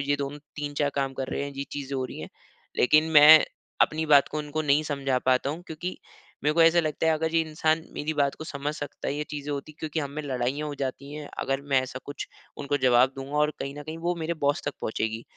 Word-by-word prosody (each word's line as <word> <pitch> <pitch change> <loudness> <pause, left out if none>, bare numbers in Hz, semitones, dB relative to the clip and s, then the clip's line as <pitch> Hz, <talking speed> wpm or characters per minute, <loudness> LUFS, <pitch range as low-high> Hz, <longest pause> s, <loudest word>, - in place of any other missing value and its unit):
ये 145 - +3
दोनों 140 +1 -4 0.2
3-4 145 0 -1
काम 135 -1 0
कर 130 0 -4
रहे - - -2
हैं 140 - -6
ये 140 0 -4
चीज़ें 140 -1 -4
हो 130 - -1
रही 125 - -7
है। - - -7 0.5
लेकिन 155 +5 +4
मैं 155 +1 +9 0.4
अपनी 155 +1 +1
बात 145 -2 +6
को 155 - -4
उनको 150 +1 -3
नहीं 145 +1 +3
समझा 135 -3 0
पाता 130 +2 +1
हूँ 165 +4 -6
क्योंकि, 170 +3 -5 0.5
मेरे 150 - +3
को 165 - +5
ऐसा 165 +1 +6
लगता 155 0 -1
है 160 - +5
अगर 160 +1 -2
ये 165 - +5
इंसान 155 +1 +1
मेरी 155 +2 -2
बात 140 -2 +1
को 155 - -8
समझ 145 0 -4
सकता 145 -1 -5
है 140 - -1
ये 150 +1 -2
चीज़े 145 -1 -5
होती 145 +1 -4
है - - -33
क्योंकि 155 0 -2
हम 140 -2 -4
में 150 +2 -5
लड़ाइयाँ 135 +2 -2
हो 145 - -5
जाती 140 +1 -5
है 150 -1 -7
अगर 135 0 -1
मैं 130 - +6
ऐसा 130 0 -6
कुछ 145 - -6 0.3
उनको 145 0 0
जवाब 125 +1 +5
दूँगा 135 +2 -5
और 150 0 +3
कहीं 140 0 -4
न - - -6
कहीं 155 +2 -7
वो 175 +2 -1
मेरे 165 +1 -2
बॉस 145 +3 +2
तक 145 - -1
पहुँचेगी। 110 +1 -2
145 Hz, 250 wpm, -27 LUFS, 140-155 Hz, 0.5 s, मैं